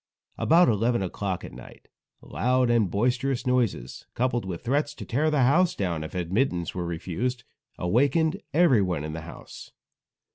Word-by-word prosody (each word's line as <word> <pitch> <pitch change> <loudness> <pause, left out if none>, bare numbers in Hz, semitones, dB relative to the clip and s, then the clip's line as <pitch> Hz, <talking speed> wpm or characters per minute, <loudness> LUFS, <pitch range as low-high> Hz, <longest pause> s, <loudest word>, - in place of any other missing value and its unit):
About 170 +3 +5
eleven 115 0 +1
o'clock 95 0 -3
at - - -9
night, - - -13 0.4
loud 125 0 +1
and 115 -5 +2
boisterous 125 +6 0
noises, 120 - -1
coupled 120 -3 0
with 90 -3 -6
threats 145 +4 0
to - - -8
tear 150 +6 +1
the 150 -4 +2
house 165 +8 +3
down 85 -5 -2
if 80 - -8
admittance 90 - -1
were 90 -2 -3
refused, 95 +9 -3 0.3
awakened 140 - +1
everyone 110 - +3
in 75 0 -5
the 80 - -5
house. 85 +1 -11
120 Hz, 150 wpm, -26 LUFS, 90-135 Hz, 0.4 s, About